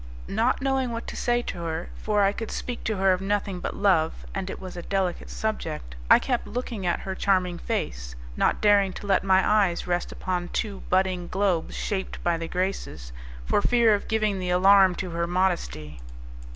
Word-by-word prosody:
Not 235 +6 +1
knowing 265 -2 +1
what 230 0 -5
to - - -7
say 240 0 +1
to 175 - -5
her, 165 0 -4
for 210 -1 +1
I 195 - +4
could 225 +2 -6
speak 245 -1 -5
to 220 -2 -1
her 190 0 +4
of 185 - -2
nothing 195 -1 -1
but - - -4
love 180 -6 +1
and 195 -1 -3
it - - -6
was 185 -1 -8
a 175 - -5
delicate 190 -1 -2
subject 75 - -4
I - - +9
kept 250 -3 -2
looking 235 -6 -4
at 175 - 0
her 190 - -4
charming 185 -2 +1
face, - - -3 0.2
not - - +1
daring 200 -2 +4
to - - -8
let 195 -2 +2
my 190 -1 +4
eyes 200 -5 +2
rest 175 0 -1
upon 180 -1 -3
two 205 -3 -2
budding 185 -1 +1
globes 185 -4 0
shaped 190 -2 -3
by 175 -1 +2
the 165 0 -4
Graces, 180 - -3 0.3
for 205 - +2
fear 235 -1 +4
of 205 - -1
giving 215 -3 0
the 180 -1 -3
alarm 190 +1 +6
to 185 -1 -4
her 170 0 -1
modesty. 170 - -1
190 Hz, 195 wpm, -26 LUFS, 175-205 Hz, 0.3 s, I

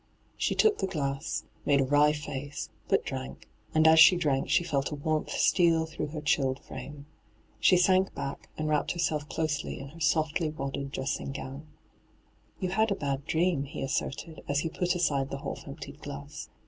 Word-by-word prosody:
She - - 0
took 435 -1 +4
the 195 - 0
glass, 140 -5 -2 0.2
made 140 -1 +3
a - - +4
wry 145 +2 +4
faee, 145 -1 -5 0.3
but - - +2
drank, 65 +1 -6 0.3
and 160 0 +6
as 160 0 +7
she 170 +3 +9
drank 145 -6 0
she - - +4
felt 140 -5 -1
a 150 - -4
warmth 155 +1 -1
steal 165 -3 +3
through 160 - -4
her 150 +1 -6
chilled 135 -3 +1
frame. 145 0 -8 0.5
She 185 - +5
sank 185 +1 +3
back 140 - -5
and 155 - -2
wrapped 150 -1 +1
herself 155 -4 -1
closely 155 -2 -2
in 135 - -8
her 165 +4 -13
softly 155 +1 +1
wadded 140 -2 -4
dressing 135 0 -3
gown. 140 +2 -7 0.5
* - - -36
Yon 185 -1 -1
had 220 +3 +2
a 200 - +1
bad 140 -4 -3
dream,' 165 -3 +1
he 140 - -6
asserted, 145 +3 -3
as 145 +1 +1
he 165 - -2
pat 180 +2 0
aside 140 -6 +1
the 140 0 -5
half 140 - -6
emptied 140 +1 -9
glass. 145 +2 -7
150 Hz, 185 wpm, -29 LUFS, 140-160 Hz, 0.5 s, she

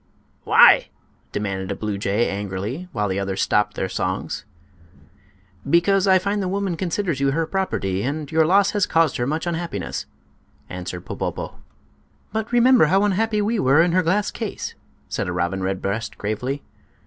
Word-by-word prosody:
"Why?" - - +7 0.4
demanded 95 -2 -3
a - - -2
blue 105 -2 -3
jay, 100 +4 +1
angrily, 100 - -4
while 105 -2 -1
the 95 0 -1
others 95 -1 -3
stopped 105 0 +1
their 95 - -1
songs. - - -3 1.2
"Because 195 +4 +3
I 190 -1 +6
find 200 +2 -1
the 190 - -1
woman 195 -1 -1
considers 170 -3 -2
you 140 0 +2
her 160 +4 0
property, 155 - -1
and 145 +5 -3
your 160 -1 +3
loss 195 +3 +4
has 205 -2 +1
caused 165 -4 +2
her 120 - -1
much 155 +4 -2
unhappiness," 165 - -3 0.6
answered 90 -1 -6
Popopo. - - -5 0.7
"But 220 +1 -2
remember 245 -4 +6
how 195 +6 +3
unhappy 210 +1 +1
we 220 +1 0
were 135 +1 +4
in 175 - +1
her 185 +2 +3
glass 190 +4 +1
case," 220 -4 -5 0.3
said - - -3
a - - -2
robin 90 +2 -1
redbreast, 100 +2 -3
gravely. 125 +7 -3
155 Hz, 160 wpm, -22 LUFS, -, 1.2 s, Why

